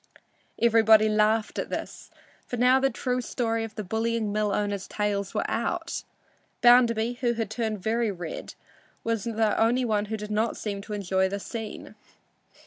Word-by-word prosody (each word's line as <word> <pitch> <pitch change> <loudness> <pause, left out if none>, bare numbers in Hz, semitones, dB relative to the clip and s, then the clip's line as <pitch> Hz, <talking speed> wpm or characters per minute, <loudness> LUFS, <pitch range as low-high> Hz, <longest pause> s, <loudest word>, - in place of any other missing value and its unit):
Everybody 220 -2 +5
laughed 215 +1 +1
at - - -3
this, - - -6 0.4
for 245 - -4
now 250 +2 +5
the 270 0 +2
true 250 -1 -2
story 230 -2 -1
of 225 -1 -7
the 215 - -4
bullying 220 +2 -1
mill 210 0 0
owner's 205 -1 -2
tales 200 -2 -2
was - - 0
out. - - -2 0.6
Bounderby, 240 -1 +5
who 240 -2 +2
had 225 -2 -3
turned 220 -3 -3
very 230 +1 +1
red, 175 -5 -6 0.5
was 225 -3 -1
the 225 -2 +1
only 245 +3 +2
one 210 -2 +1
who 220 +1 -4
did 210 0 -7
not 215 +2 0
seem 200 -2 -4
to 210 +1 -8
enjoy 190 -1 0
the 200 +1 -3
scene. 220 +1 -7
220 Hz, 165 wpm, -26 LUFS, 210-230 Hz, 0.6 s, Everybody